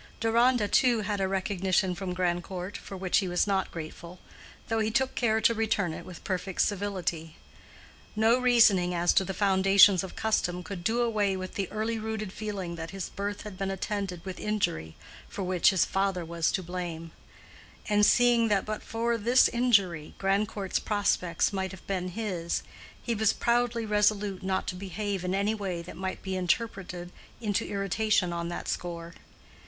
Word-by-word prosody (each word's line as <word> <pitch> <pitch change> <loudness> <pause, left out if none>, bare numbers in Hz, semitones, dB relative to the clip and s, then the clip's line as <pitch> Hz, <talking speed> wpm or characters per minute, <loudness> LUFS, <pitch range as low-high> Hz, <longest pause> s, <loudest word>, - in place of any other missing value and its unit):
Deronda, 230 0 +3
too, 240 0 +3
had 205 -1 -2
a 190 - +1
recognition 190 -1 0
from 185 0 -4
Grandcourt, 180 +1 -2
for 195 - -7
which 185 -1 +2
he 195 - -2
was 180 0 +1
not 195 -2 0
grateful, 170 +2 -8 0.5
though 225 -1 0
he 215 0 +1
took 265 +3 +1
care 220 -2 +1
to 230 - +4
return 215 -6 0
it - - -8
with 180 -2 -10
perfect 185 0 -2
civility. 180 -6 -2 0.8
No 225 +3 +4
reasoning 215 -8 +4
as 175 +1 +3
to - - +4
the 190 0 -5
foundations 195 -1 +5
of 190 - -8
custom 180 -5 0
could 190 -3 -7
do 230 +5 +1
away 205 -4 +1
with 185 0 -6
the 195 -3 -3
early 220 +1 -2
rooted 215 -2 -4
feeling 195 -5 -5
that 165 0 -6
his 195 -1 -5
birth 205 +1 -4
had 205 -3 -9
been 195 0 -1
attended 195 -2 -3
with 190 -1 -6
injury 80 - -2 0.3
for 195 - -5
which 180 -1 +3
his 190 -3 +3
father 195 -3 -1
was 165 -1 0
to 190 - -1
blame; 170 -2 -5 0.8
and 210 -1 +3
seeing 240 +1 +5
that 205 -3 +1
but 215 0 -4
for 230 +1 -1
this 240 +4 +5
injury 200 -10 +1
Grandcourt's 195 0 0
prospects 200 -4 0
might 190 -1 -1
have 190 -1 -12
been 185 -2 -2
his, 180 -4 -3 0.4
he 235 - -1
was 220 -1 +2
proudly 235 -1 +1
resolute 210 -2 +1
not 190 0 -1
to - - -3
behave 195 +1 -4
in 180 +1 -1
any 200 +2 +1
way 190 -5 -4
that - - -10
might 190 +2 -5
be 190 -1 -3
interpreted 180 -2 -2 0.3
into 210 -4 -1
irritation 200 -2 +1
on 170 0 -3
that 175 - -5
score. 170 -1 -4
195 Hz, 175 wpm, -28 LUFS, 180-215 Hz, 0.8 s, foundations